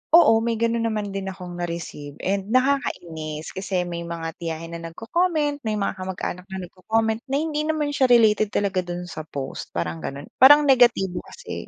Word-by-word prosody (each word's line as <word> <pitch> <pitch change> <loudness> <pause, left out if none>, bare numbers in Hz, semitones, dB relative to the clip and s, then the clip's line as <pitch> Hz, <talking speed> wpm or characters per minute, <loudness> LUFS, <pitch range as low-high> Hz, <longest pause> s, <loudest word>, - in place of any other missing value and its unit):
Oo, 225 -10 +7
may 230 0 0
gano'n 230 0 +1
naman 210 -2 -2
din 195 0 -4
akong 180 -2 -7
na-receive 170 -4 -5
and 195 0 -1
nakakainis 175 - -1
kasi 190 -1 -2
may 170 -1 -5
mga 165 -1 -5
tiyahin 165 0 -5
na 170 0 -6
nagco-comment. 295 - 0
May 215 - 0
mga 200 -1 -1
kamag-anak 185 -1 -4
na 190 -1 -6
nagco-comment 220 +5 -1
na 270 - -1
hindi 305 0 -1
naman 305 -2 0
siya 270 -2 +3
related 220 -3 +5
talaga 200 -2 0
do'n 175 0 -4
sa 160 -3 -8
post, 135 -3 -5
parang 80 -1 -2
gano'n. 140 - -7
Parang 290 +3 +9
negatibo 240 -9 +4
kasi. 485 - -8
195 Hz, 175 wpm, -24 LUFS, 170-240 Hz, -, Parang